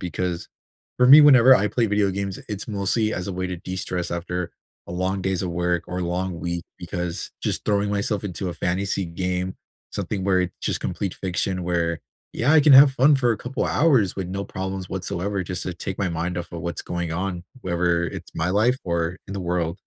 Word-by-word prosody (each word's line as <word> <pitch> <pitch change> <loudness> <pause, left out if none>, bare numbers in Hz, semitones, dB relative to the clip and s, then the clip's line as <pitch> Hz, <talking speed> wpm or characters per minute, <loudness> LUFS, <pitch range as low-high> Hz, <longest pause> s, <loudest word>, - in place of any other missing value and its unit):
because, 90 0 -3 0.5
for 125 - +5
me, 145 +4 +10
whenever 130 -3 +8
I 105 +1 +1
play 115 +3 +1
video 105 -1 +2
games, 100 0 -3
it's 105 +1 -5
mostly 105 +2 0
as 90 - -4
a - - -3
way 95 +1 -2
to 90 -1 -4
destress 90 0 -4
after 85 0 -3 0.3
a 85 - -7
long 95 +2 -1
days 95 0 -1
of 90 - -2
work, 85 0 0
or 90 - -3
a 90 - -1
long 90 0 -2
week, 85 -1 -3
because 90 -1 -4
just - - -2
throwing 100 -1 +1
myself 105 +1 -1
into 95 -1 -4
a 85 - -4
fantasy 95 +2 -1
game, 90 +1 -2 0.4
something 95 -3 -3
where 95 -1 +3
it's 90 - -4
just - - -1
complete 95 -3 -3
fiction 95 0 -2
where, 85 -2 0 0.3
yeah, 130 +6 +2
I 160 - +7
can 145 0 +6
have 135 0 +9
fun 140 +3 +5
for 125 -3 +2
a - - -2
couple 130 +2 -3
hours 130 - +3
with 95 -2 -3
no 100 +2 -3
problems 95 -1 -5
whatsoever, 95 +1 -3
just 90 0 -4
to 90 - -4
take 95 +3 -5
my 95 - 0
mind 85 +1 -2
off 85 - -7
of 85 - -5
what's 85 0 -4
going 85 -2 -3
on, 90 0 -3 0.2
whether 85 -2 +1
it's - - -7
my 80 +2 0
life, 115 +6 +2
or 85 0 -1
in 100 - -7
the 100 - -3
world. 85 +1 -2
95 Hz, 215 wpm, -23 LUFS, 90-100 Hz, 0.5 s, me